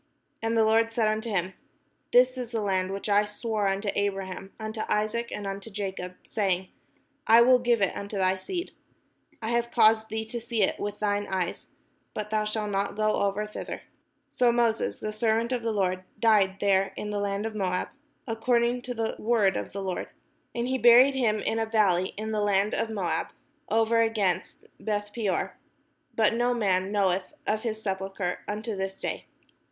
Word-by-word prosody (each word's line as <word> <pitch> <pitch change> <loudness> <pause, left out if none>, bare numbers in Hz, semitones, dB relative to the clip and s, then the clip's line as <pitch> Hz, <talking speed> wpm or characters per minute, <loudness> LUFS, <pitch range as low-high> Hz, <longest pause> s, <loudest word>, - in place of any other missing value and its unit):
And 225 0 0
the 220 - +5
Lord 225 +1 +3
said 225 -1 +1
unto 215 +2 -1
him: 190 -2 -1 0.6
"This 250 +1 +5
is 250 -2 -5
the 230 -2 -2
land 190 -2 0
which 195 +2 -4
I 205 0 +4
sware 210 0 -2
unto 195 +1 0
Abraham, 195 -1 -3
unto 220 0 -4
Isaac, 215 +3 0
and 205 - -5
unto 195 +2 -5
Jacob, 190 -3 -5
saying, 190 -3 -1 0.6
I 230 +1 +8
will 250 +1 +6
give 240 -3 +2
it 195 - +1
unto 200 +1 -5
thy 185 0 +3
seed: 345 - -5 0.7
I 220 - -1
have 235 0 +1
caused 220 -1 +4
thee 220 0 -3
to 235 +2 -5
see 230 -2 0
it - - 0
with 205 0 -3
thine 205 -1 0
eyes, 185 -2 -2 0.5
but 210 0 -4
thou 215 -1 +1
shalt 210 -1 -2
not 200 0 -1
go 215 0 +1
over 200 +1 0
thither." 210 - -7 0.5
So 245 -1 +3
IVIoses 235 -2 +1
the 215 - -3
servant 225 +2 +1
of 250 -2 0
the 230 0 -1
Lord 185 -3 0 0.2
died 205 -4 +4
there 195 -1 +2
in 210 - -4
the 205 - -1
land 200 +1 -1
of 225 - -3
Moab, 185 -3 -1 0.4
according 235 +1 +1
to 245 0 -5
the 225 -1 -2
word 210 -5 +2
of - - -4
the 200 0 -5
Lord. 185 -2 -3 0.5
And 240 +1 -1
he 260 0 0
buried 245 +3 +7
him 235 -5 +1
in 225 - -1
a 225 - 0
valley 195 -5 +2
in 220 +1 -3
the 215 -1 0
land 205 0 +2
of 225 - -1
Moab, 200 -6 -1 0.4
over 225 +1 +3
against 205 -5 0
Beth 205 -1 -2
peor: 210 -5 -1 0.6
but 225 0 +3
no 245 +1 +1
man 190 -4 +1
knoweth 195 +3 0
of 215 0 0
his 220 -2 -4
sepulchre 190 -2 -2
unto 215 +1 -3
this 190 0 -4
day. - - -4
215 Hz, 185 wpm, -27 LUFS, 195-230 Hz, 0.7 s, I